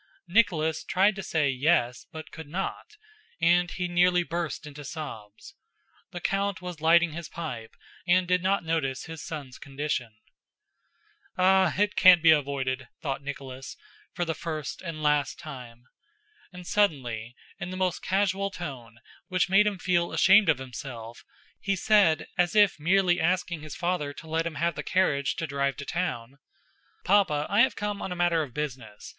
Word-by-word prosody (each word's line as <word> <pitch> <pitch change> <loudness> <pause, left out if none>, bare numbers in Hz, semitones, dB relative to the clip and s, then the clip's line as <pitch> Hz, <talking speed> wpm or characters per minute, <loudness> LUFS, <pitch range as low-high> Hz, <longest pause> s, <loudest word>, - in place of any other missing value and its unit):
Nicholas 170 -6 +2
tried 195 +2 +2
to 195 - -5
say 160 -5 0
"Yes," 130 -2 +1
but 160 0 -9
could 160 -2 -9
not: 195 - -5 0.4
and 175 +1 +3
he 180 0 -3
nearly 175 0 +3
burst 170 -2 -4
into 145 0 -9
sobs. 110 -9 -8 0.6
The 175 - -7
count 195 +2 -1
was 180 -3 -8
lighting 170 +1 +4
his 165 +1 -7
pipe 125 -10 -7 0.3
and 180 +1 +3
did 180 0 +2
not 190 +1 +1
notice 140 -5 -1
his 160 -1 -8
son's 140 -5 -7
condition. 135 -5 -4 1.2
"Ah, 185 -2 +4
it 205 +1 +1
can't 180 -3 +7
be 160 - +8
avoided!" 135 -3 0
thought 140 -2 -3
Nicholas, 135 -2 -8 0.3
for 175 - -2
the 165 - -1
first 155 -3 -5
and 165 -4 -6
last 150 -1 +1
time. 125 -7 -10 0.7
And 180 -1 -11
suddenly, 125 - 0 0.2
in 175 -1 -5
the 185 - -6
most 185 -2 -1
casual 195 0 0
tone, 130 - -8 0.3
which 185 -1 0
made 200 +3 +5
him 205 -2 -1
feel 175 -2 0
ashamed 200 -1 +6
of 160 - +4
himself, 120 -3 -8 0.4
he 195 -1 -1
said, 195 -4 +3
as 175 +3 +2
if 205 -6 +4
merely 180 +2 +3
asking 175 -1 0
his 155 0 -8
father 170 -5 -2
to 160 - -12
let 165 +1 -1
him 160 - -6
have 170 +3 0
the - - -5
carriage 145 -7 +1
to 165 - -3
drive 140 -2 -1
to 140 - -6
town: 140 -7 -3 0.7
"Papa, 180 -7 +3
I 205 +3 +5
have 260 - +3
come 205 0 -3
on 190 - -4
a - - -3
matter 175 -2 +2
of 140 -5 -6
business. 125 -8 -6
165 Hz, 165 wpm, -27 LUFS, 140-185 Hz, 1.2 s, be